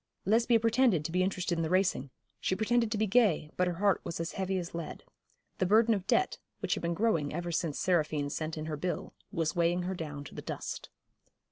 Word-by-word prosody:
Lesbia 230 +3 +4
pretended 230 - +3
to 165 - -2
be 180 +2 +2
interested 185 -2 0
in - - +1
the 160 - -1
racing 185 -7 +1 0.3
she 185 - 0
pretended 225 +2 +1
to 215 - 0
be 215 - +2
gay, 200 -8 +3
but 180 - +2
her 175 - -1
heart 200 +2 +2
was 165 - -5
as 165 0 -2
heavy 190 0 -1
as 175 -2 -4
lead. 170 -1 -6 0.6
The 185 - +2
burden 225 +3 +5
of 195 -3 -3
debt, 375 - +2 0.2
which - - 0
had - - -3
been 170 0 -1
growing 165 -9 +1
ever 175 +2 -3
since 165 -3 -1
Seraphine 155 -5 +1
sent 155 +1 -3
in 155 - -4
her 155 -1 -3
bill, 180 +4 -3 0.2
was 165 -2 -1
weighing 175 +1 +2
her 185 +2 -2
down 150 -5 -5
to - - -11
the - - -6
dust. - - -5
180 Hz, 225 wpm, -31 LUFS, 165-205 Hz, 0.6 s, burden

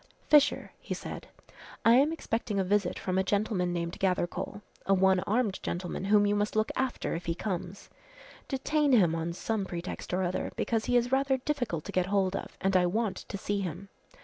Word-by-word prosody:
"Fisher," 295 -2 +4
he - - -5
said, - - -7 0.6
"I 230 - +7
am 275 +5 +5
expecting 225 -9 -2
a - - +2
visit 195 -1 +1
from 185 0 -1
a - - +2
gentleman 200 -2 0
named 170 -1 -3
Gathercole 190 +2 -1 0.2
a 195 - +5
one 190 0 +4
armed 215 -2 +1
gentleman 180 +1 -3
whom 205 +1 +5
you 205 - +2
must 205 +1 -1
look 215 0 +1
after 260 -1 -1
if 165 +1 -5
he 165 - 0
comes. 185 -1 -4 0.6
Detain 290 +1 +1
him 180 -9 +5
on 165 +1 -2
some 210 +4 -2
pretext 175 -1 -6
or 185 +1 +1
other 180 0 -2
because 225 -2 -1
he 245 - +3
is 245 +1 +1
rather 270 0 +2
difficult 250 - -2
to - - -7
get 185 -1 +1
hold 195 -1 +1
of - - -6
and 195 0 +1
I 180 -1 +5
want 215 +2 -1
to 200 - -5
see 200 +1 -2
him. 190 +1 -5
200 Hz, 200 wpm, -29 LUFS, 180-230 Hz, 0.6 s, I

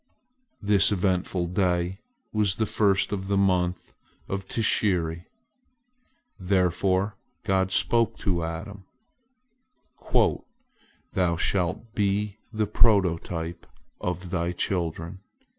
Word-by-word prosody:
This 100 0 +5
eventful 90 -2 0
day 90 0 0 0.3
was 105 -3 +2
the 110 - 0
first 100 -3 +2
of 95 -2 -3
the 100 0 +1
month 90 -2 +1 0.3
of 95 0 -4
Tishri. 90 -7 +1 1.1
Therefore 95 +1 +1 0.3
God 95 -1 +1
spoke 115 +2 +2
to 85 -5 -1
Adam: 95 +4 -6 2.3
"Thou 90 -3 +1
shalt 95 +6 -1
be 105 0 0
the 110 -2 0
prototype 90 -6 +1 0.3
of 90 0 -4
thy 85 -1 -1
children. 85 0 -2
95 Hz, 90 wpm, -26 LUFS, 90-100 Hz, 2.3 s, This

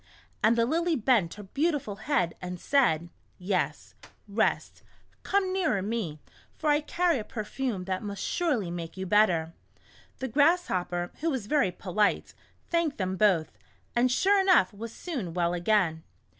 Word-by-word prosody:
And 220 +2 +4
the 230 - +3
Lily 335 +5 +1
bent 220 - +2
her 210 - -9
beautiful 275 - -1
head 215 - 0
and 180 -1 -5
said: 175 - +2 0.2
" - - -38
Yes, 180 -6 -2 0.3
rest, 215 +2 -1 0.4
come 385 -2 0
nearer 320 - +1
me, 200 -8 -3 0.4
for 305 -1 +1
I 295 +1 +3
carry 340 -1 +1
a - - -4
perfume 215 -1 -4
that 185 0 -3
must 200 -2 -5
surely 255 - 0
make 170 0 -6
you 190 - -3
better." 175 -5 +3 0.6
The 260 - -3
Grasshopper, 220 - +1
who 330 - 0
was 260 -8 -2
very 275 -5 +2
polite, 200 +3 0 0.3
thanked 335 -4 0
them 185 -1 -2
both, 185 -6 +2 0.4
and 245 +1 +3
sure 390 +9 +4
enough 370 - +4
was 225 +3 -7
soon 230 - -5
well 175 -1 +1
again. 175 -3 +1
215 Hz, 155 wpm, -28 LUFS, 180-290 Hz, 0.6 s, And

